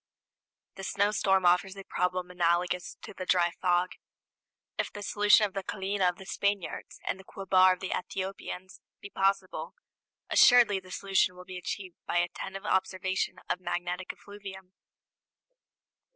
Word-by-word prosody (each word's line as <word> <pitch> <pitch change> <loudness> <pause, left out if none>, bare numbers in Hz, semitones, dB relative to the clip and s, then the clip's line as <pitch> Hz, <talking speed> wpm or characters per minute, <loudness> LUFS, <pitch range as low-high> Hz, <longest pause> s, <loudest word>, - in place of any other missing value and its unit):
The 195 - -7
snowstorm 195 -1 +2
offers 180 +2 +3
a 195 - -7
problem 180 -1 -1
analogous 175 0 0
to - - -8
the 185 -1 -7
dry 175 -2 +3
fog. 180 0 +2 0.8
If - - -2
the 205 - -7
solution 210 +2 +5
of 200 - -5
the 195 - -2
callina 195 0 -1
of 180 - -4
the 190 - -11
Spaniards 200 -1 -2
and 190 - -2
the - - -12
quobar 185 -1 +4
of 180 - -9
the 190 - -2
Ethiopians 185 0 -5 0.2
be 200 - -10
possible, 195 -1 0 0.5
assuredly 240 -6 +6
that 185 0 -16
solution 190 -2 +1
will 180 0 -11
be 185 0 -7
achieved 180 0 -6
by - - 0
attentive 190 +3 -3
observation 185 -1 0
of 180 - -1
magnetic 180 0 -3
effluvium. 190 -2 -11
190 Hz, 145 wpm, -29 LUFS, 180-195 Hz, 0.8 s, assuredly